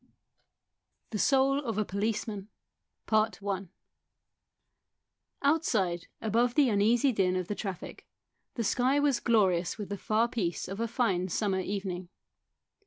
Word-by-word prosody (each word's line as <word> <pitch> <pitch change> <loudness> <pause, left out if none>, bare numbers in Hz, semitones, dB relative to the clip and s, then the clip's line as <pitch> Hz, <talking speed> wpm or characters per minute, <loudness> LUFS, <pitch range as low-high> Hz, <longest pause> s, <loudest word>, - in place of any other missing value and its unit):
THE 215 - -2
SOUL 275 +2 +3
OF 225 -5 -3
A 215 - +1
POLICEMAN 205 0 -2 3.0
OUTSIDE, 215 - +1
above 235 +2 +1
the 285 -4 +5
uneasy 225 +6 +3
din 190 -5 +1
of 185 -1 -2
the - - -2
traffic, 195 -3 -6 0.5
the 235 - -1
sky 255 +6 +2
was 285 -3 +2
glorious 190 -7 +2
with 210 -3 -6
the 200 -1 -4
far 220 +2 +2
peace 190 -8 -2
of 195 +2 -6
a 230 - 0
fine 210 -7 0
summer 190 +1 0
evening. 185 -2 -4
215 Hz, 120 wpm, -29 LUFS, 190-240 Hz, 3.0 s, the